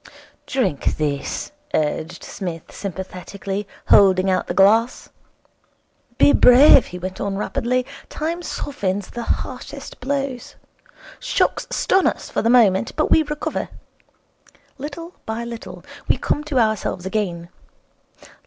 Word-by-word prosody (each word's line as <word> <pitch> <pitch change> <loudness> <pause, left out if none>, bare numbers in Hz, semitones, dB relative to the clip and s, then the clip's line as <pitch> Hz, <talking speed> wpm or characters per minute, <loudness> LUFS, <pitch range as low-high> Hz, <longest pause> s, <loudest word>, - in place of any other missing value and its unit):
'Drink 240 - 0
this,' 145 -2 -2 0.2
urged 155 +2 -2
Psmith 170 -4 -6
sympathetically, 195 +1 -6 0.2
holding 190 -1 +5
out 185 - 0
the - - -2
glass. 220 +5 +3 1.1
'Be 285 - +6
brave,' 255 +2 +7
he 180 - -8
went 185 +1 -6
on 200 -1 -2
rapidly. 250 +3 -1 0.2
'Time 330 +3 -3
softens 205 - -3
the 240 - -5
harshest 265 +4 -5
blows. 270 -1 -3 0.6
Shocks - - 0
stun 385 -6 +2
us - - -3
for - - 0
the 230 - +1
moment, 225 -4 +4
but 310 - 0
we 320 - +6
recover. 300 -1 -3 1.1
Little 320 +5 -7
by 220 +1 -3
little 235 -1 -8 0.2
we - - +3
come 295 - -1
to 300 -3 -2
ourselves 215 -5 0
again. 185 -4 -2
220 Hz, 120 wpm, -21 LUFS, 185-275 Hz, 1.1 s, brave